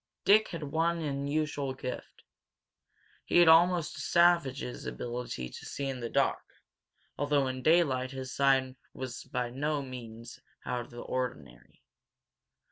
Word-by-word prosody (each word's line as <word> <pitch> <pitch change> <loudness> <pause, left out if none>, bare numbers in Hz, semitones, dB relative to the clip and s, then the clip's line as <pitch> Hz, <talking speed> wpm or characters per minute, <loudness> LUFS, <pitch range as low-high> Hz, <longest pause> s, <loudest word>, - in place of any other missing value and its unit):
Dick 215 +2 +6
had 170 -4 -6
one 165 +4 0
unusual 145 -2 -2
gift. 125 -1 -7 1.0
He - - +1
had 175 -1 +7
almost 170 0 +5
a - - -9
savage's 155 -7 +2
ability 120 - -4
to - - -10
see 140 - -4
in 135 -2 -4
the 120 -1 -4
dark, - - +1 0.8
although 145 -1 +2
in 130 0 -3
daylight 135 -5 +3
his 130 -1 -6
sight 135 -1 +2 0.2
was 130 -2 -6
by 125 -1 -3
no 145 +2 -1
means 120 -2 -9 0.3
out 125 -1 -2
of - - -18
the 120 0 -9
ordinary. 125 - -5
135 Hz, 135 wpm, -30 LUFS, 125-155 Hz, 1.0 s, had